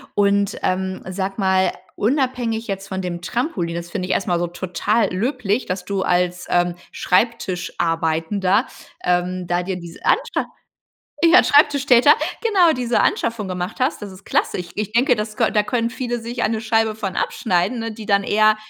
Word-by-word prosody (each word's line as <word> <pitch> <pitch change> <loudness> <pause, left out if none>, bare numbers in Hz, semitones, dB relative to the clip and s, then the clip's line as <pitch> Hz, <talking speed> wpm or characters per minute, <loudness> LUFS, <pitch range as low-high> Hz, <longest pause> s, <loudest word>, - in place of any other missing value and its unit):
und, 200 0 +2
ähm, 190 0 -1
sag 190 +1 -3
mal 190 -2 +2 0.2
unabhängig 245 -2 0
jetzt 195 -1 -4
von 190 -1 -4
dem 175 -2 -4
Trampolin, 185 - -2
das 170 0 -6
finde 185 -2 -3
ich - - 0
erst 195 - -1
mal 175 -2 +1
so 175 - -1
total 185 +5 -1
löblich, 215 +2 -1
dass 180 0 -3
du 195 0 -2
als, 180 0 0
ähm, 175 0 +1 0.2
Schreibtischarbeitender, 180 -3 0 0.4
ähm, 180 +1 0
da 175 +1 0
dir 190 +1 -3
diese 170 -1 -10
Anscha - - +1 0.8
ja 340 +2 +7
Schreibtischtäter 285 -2 +5 0.3
genau, 385 -8 +4
diese 245 -4 0
Anschaffung 230 -4 0
gemacht 180 +2 -4
hast. 255 -2 0
Das 200 -2 -7
ist 190 +1 -15
klasse. - - 0
Ich 175 -1 -6
ich 210 0 -3
denke 245 +2 +4
das 215 0 -4
kö 230 - +2
da 210 - +2
können 230 +2 -1
viele 245 -1 -3
sich 235 +2 -5
eine 220 0 0
Scheibe 225 -1 +1
von 205 -3 -4
abschneiden, 185 +4 0
ne, 225 0 -4
die 215 -1 -9
dann 200 -2 +3
eher, 215 +1 +4
200 Hz, 175 wpm, -21 LUFS, 180-230 Hz, 0.8 s, ja